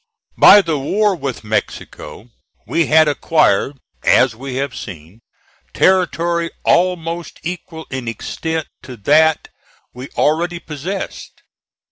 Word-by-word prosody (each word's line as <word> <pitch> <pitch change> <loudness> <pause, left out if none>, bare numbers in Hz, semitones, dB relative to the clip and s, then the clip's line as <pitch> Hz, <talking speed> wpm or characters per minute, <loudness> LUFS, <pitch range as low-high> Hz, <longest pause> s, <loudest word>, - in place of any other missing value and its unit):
By 205 - +8
the 160 -4 -1
war 205 +8 +1
with 135 -8 -5
Mexico, 105 -1 -5 0.3
we 165 -1 0
had 155 0 +5
acquired, 145 -4 +1 0.2
as 125 -3 +3
we 130 +2 -7
have 135 -1 -3
seen, 90 +2 -10 0.5
territory 170 -2 +1 0.2
almost 170 -1 0
equal 165 -1 -6
in 130 -2 -5
extent 160 +7 -4
to 125 -2 -10
that 155 +8 +3 0.4
we 125 +2 -9
already 170 +3 +1
possessed. 170 +4 -7
155 Hz, 110 wpm, -18 LUFS, 130-170 Hz, 0.5 s, By